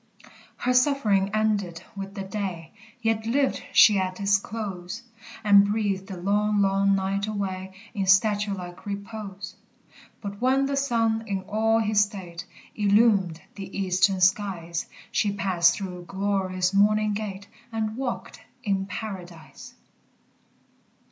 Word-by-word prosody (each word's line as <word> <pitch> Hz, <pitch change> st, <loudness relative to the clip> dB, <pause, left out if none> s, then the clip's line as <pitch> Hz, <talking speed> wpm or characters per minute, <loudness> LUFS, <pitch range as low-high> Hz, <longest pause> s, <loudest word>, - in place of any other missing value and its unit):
Her 250 Hz, -, 0 dB
suffering 250 Hz, -7 st, +3 dB
ended 205 Hz, -6 st, 0 dB
with 195 Hz, 0 st, -7 dB
the 195 Hz, -, -4 dB
day; 190 Hz, -5 st, -5 dB, 0.3 s
Yet 225 Hz, -1 st, 0 dB
lived 275 Hz, +3 st, +1 dB
she 210 Hz, -3 st, +7 dB
at 185 Hz, 0 st, -2 dB
its 200 Hz, 0 st, +3 dB
close, 200 Hz, 0 st, -6 dB, 0.4 s
And 200 Hz, -1 st, +6 dB
breathed 200 Hz, -3 st, -1 dB
the 190 Hz, -, -7 dB
long, 205 Hz, +3 st, +1 dB
long 195 Hz, 0 st, +3 dB
night 195 Hz, +1 st, -1 dB
away, 190 Hz, -2 st, -4 dB, 0.2 s
In 195 Hz, -4 st, -2 dB
statue 205 Hz, +1 st, +3 dB
like 180 Hz, +1 st, -9 dB
repose. 200 Hz, -1 st, -6 dB, 0.6 s
But 200 Hz, 0 st, -7 dB
when 265 Hz, +2 st, +3 dB
the 275 Hz, 0 st, -1 dB
sun, 230 Hz, -5 st, +1 dB
in 195 Hz, -2 st, -2 dB
all 220 Hz, +3 st, +1 dB
his 215 Hz, -2 st, +3 dB
state, 185 Hz, -5 st, -4 dB, 0.3 s
Illumed 200 Hz, -5 st, +3 dB
the 195 Hz, -1 st, -8 dB
eastern 190 Hz, 0 st, +2 dB
skies, 185 Hz, -3 st, +1 dB, 0.2 s
She 205 Hz, -, +1 dB
passed 185 Hz, -4 st, +3 dB
through 180 Hz, -3 st, -6 dB
glory's 190 Hz, -1 st, -1 dB
morning 210 Hz, +1 st, +3 dB
gate, 200 Hz, -1 st, -5 dB, 0.2 s
And 220 Hz, -1 st, -2 dB
walked 255 Hz, -1 st, -4 dB, 0.2 s
in 195 Hz, -2 st, 0 dB
Paradise! 180 Hz, -7 st, -8 dB
200 Hz, 130 wpm, -26 LUFS, 190-215 Hz, 0.6 s, she